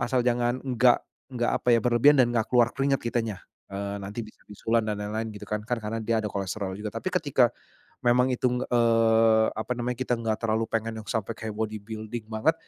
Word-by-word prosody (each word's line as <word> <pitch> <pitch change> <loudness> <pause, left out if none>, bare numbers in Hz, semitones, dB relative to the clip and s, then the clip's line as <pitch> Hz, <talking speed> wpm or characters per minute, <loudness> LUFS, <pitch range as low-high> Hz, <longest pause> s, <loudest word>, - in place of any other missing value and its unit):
asal 125 +1 +1
jangan 120 +1 +1
enggak 125 -1 +3 0.3
enggak, 120 -1 0
apa - - -5
ya, 115 - +3
berlebihan 125 +4 +5
dan 120 -2 +4
enggak 115 -2 +1
keluar 120 -2 +4
keringat 135 0 +1
kitanya, 115 -5 -2 0.3
eee, 100 +1 -3
nanti 100 +4 -5
bisa 110 - -16
bisulan 115 +2 0
dan 105 -1 -1
lain-lain, 110 +2 -3
gitu 105 - -8
kan. 105 0 -1
Kan 120 0 -1
karena 110 +2 -3
dia 110 0 0
ada 105 - -2
kolesterol 100 0 -3
juga, 105 0 -4
tapi 115 +10 -2
ketika 140 -9 +3 0.5
memang 125 +1 +4
itu, 125 - 0 0.2
eee, 115 -2 +4
apa 110 +3 -3
namanya, 125 +1 -1
kita 130 -1 0
enggak 110 -2 -1
terlalu 110 0 +1
pengen 115 0 -2
yang 105 - -20
sampai 110 -2 -2
kayak 110 -1 -5
body 110 -1 -2
building 110 +1 -6
banget, 110 +9 +2
115 Hz, 205 wpm, -26 LUFS, 110-120 Hz, 0.5 s, berlebihan